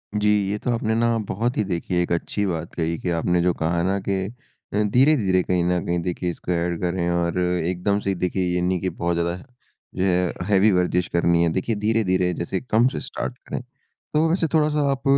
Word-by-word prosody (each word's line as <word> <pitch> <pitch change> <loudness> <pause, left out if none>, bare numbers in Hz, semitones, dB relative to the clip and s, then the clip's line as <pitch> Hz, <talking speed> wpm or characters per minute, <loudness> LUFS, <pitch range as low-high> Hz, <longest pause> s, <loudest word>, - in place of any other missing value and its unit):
जी। 105 0 +2 0.2
ये 105 - -1
तो 125 - -1
आपने 110 -1 0
ना 115 0 +2
बहुत 120 +5 -1
ही 110 - +2
देखिए 90 -1 -1
एक 85 - -2
अच्छी 100 +4 -1
बात 85 -3 -3
कही 85 0 -1
कि 90 - -3
आपने 85 +1 +1
जो 90 0 +2
कहा 85 +1 0
ना 95 +2 +1
कि 100 +1 -2 0.6
अ, 105 - +2
धीरे-धीरे 110 -5 +3
कहीं 90 -1 +1
न 90 0 +1
कहीं 85 0 0
देखिए 90 0 -2
इसको 85 +1 -5
एड 85 -1 -1
करें 85 -1 0
और 85 0 0
एकदम 90 +3 0
से 100 - -3
ही 95 - 0
देखिए 90 +1 -1
ये 90 - 0
नहीं 90 0 +1
कि 95 - 0
बहुत 85 -1 -2
ज़्यादा 85 +1 0 0.6
जो 90 - 0
है 90 -2 +1
हैवी 105 +1 +4
वर्ज़िश 90 -1 +1
करनी 85 0 +3
है 85 - +3
देखिए 100 +4 -1
धीरे-धीरे 100 -4 +1
जैसे 85 +3 -3
कम 120 0 +3
से 130 - -2
स्टार्ट 125 -1 -4
करें। - - -3 0.5
तो 155 +2 +3
वैसे 170 0 +1
थोड़ा-सा 150 -1 +2
आप 135 -1 -3
90 Hz, 215 wpm, -23 LUFS, 85-105 Hz, 0.6 s, हैवी